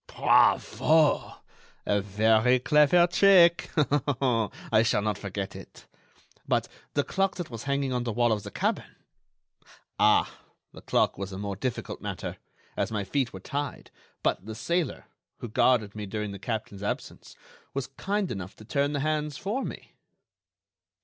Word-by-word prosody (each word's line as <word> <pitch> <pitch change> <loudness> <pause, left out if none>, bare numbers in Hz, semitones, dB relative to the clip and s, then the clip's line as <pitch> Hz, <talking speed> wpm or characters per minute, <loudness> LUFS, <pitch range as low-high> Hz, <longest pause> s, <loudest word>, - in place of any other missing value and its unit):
"Bravo! 155 -1 +3 0.5
a 100 0 +1
very 110 +5 +3
clever 150 +6 +5
trick. 175 -1 +5
I 130 -7 +1
shall 110 -2 +1
not 105 -2 -1
forget 100 -1 -5
it. - - -12 0.6
But - - +1 0.3
the 145 - +2
clock 195 +4 0
that 175 -7 -6
was 115 +1 -7
hanging 140 -1 0
on 125 -1 -1
the 120 - -2
wall 120 +1 +2
of 105 -1 0
the - - -8
cabin?" - - -2 1.0
"Ah! - - +3 0.3
the - - -12
clock - - +1
was 100 0 -5
a 95 - -6
more 100 0 -4
difficult 120 +5 -4
matter, - - -5 0.4
as - - -1
my 105 -2 -1
feet 130 +5 -1
were 95 - -8
tied, 145 +9 -5 0.3
but - - 0
the 110 - -6
sailor, 170 +3 -2 0.3
who - - -6
guarded 110 -2 +2
me 105 -1 -6
during 105 0 -4
the 100 - -8
captain's 105 -2 -4
absence, 100 - -5 0.4
was 140 -2 -1
kind 195 +7 -2
enough 95 -1 -6
to 110 - -14
turn 140 +5 0
the 145 - -1
hands 150 -1 -1
for 220 +8 -2
me." - - -8
125 Hz, 155 wpm, -27 LUFS, 105-150 Hz, 1.0 s, clever